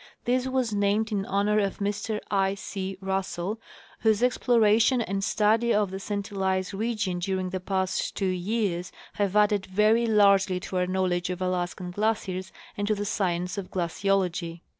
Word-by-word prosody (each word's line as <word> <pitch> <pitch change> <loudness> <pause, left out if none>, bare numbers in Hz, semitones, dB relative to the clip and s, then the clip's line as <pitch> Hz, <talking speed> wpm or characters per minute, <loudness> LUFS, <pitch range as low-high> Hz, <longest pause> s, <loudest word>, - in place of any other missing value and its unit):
This 255 +1 +1
was 255 -4 0
named 205 +2 +1
in 200 -2 -1
honor 205 +2 +2
of 200 -2 -1
Mr 205 +1 -2
I. 195 -1 +2
C. 195 -1 -5
Russell, 195 +2 -2 0.4
whose 220 0 +2
exploration 235 -1 +3
and 195 -3 -2
study 220 +3 +2
of 205 -3 +2
the 190 - -5
St 200 +1 -4
Elias 190 -1 -1
region 210 -3 -1
during 185 0 -2
the 185 - -2
past 190 0 -1
two 195 - -1
years 185 -1 -1 0.3
have 200 -1 0
added 210 -2 +3
very 215 +5 +3
largely 200 -3 +4
to 185 - -4
our 180 0 +1
knowledge 185 -1 0
of 180 0 -3
Alaskan 180 0 -2
glaciers 190 -2 -1 0.2
and 205 0 -2
to 215 - +2
the 205 0 -3
science 180 -1 -1
of 190 - -7
glaciology. 175 -1 -1
195 Hz, 160 wpm, -27 LUFS, 185-210 Hz, 0.4 s, largely